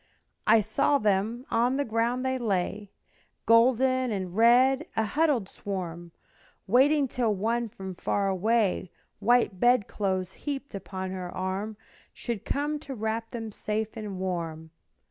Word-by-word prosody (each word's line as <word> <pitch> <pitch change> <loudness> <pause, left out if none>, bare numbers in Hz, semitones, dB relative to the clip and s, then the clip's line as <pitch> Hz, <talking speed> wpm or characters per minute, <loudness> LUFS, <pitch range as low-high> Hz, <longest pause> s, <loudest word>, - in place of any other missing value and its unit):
I 220 +1 +6
saw 245 +7 +2
them; 215 +3 0
on 240 +3 +2
the 285 +1 0
ground 235 +3 0
they 260 0 0
lay, 205 -2 -1 0.6
Golden 255 +2 +4
and 190 -4 -3
red, 255 - +5
a 220 - +2
huddled 275 -2 +1
swarm, 175 -4 -6 0.5
Waiting 275 +6 +4
till 235 -4 0
one 230 +4 -1
from 190 -2 -7
far 200 +3 -1
away, 195 0 +1 0.3
White 225 -3 +2
bed 240 -2 +4
clothes 190 -2 -2
heaped 280 -1 -5
upon 190 -1 -5
her 185 -1 -5
arm, 195 +3 -3 0.4
Should 235 -5 -5
come 295 +1 -1
to 275 -2 -7
wrap 220 +1 -2
them 225 -3 -6
safe 215 +1 -3
and 210 -3 -5
warm. 165 -4 -4
220 Hz, 140 wpm, -27 LUFS, 190-245 Hz, 0.6 s, I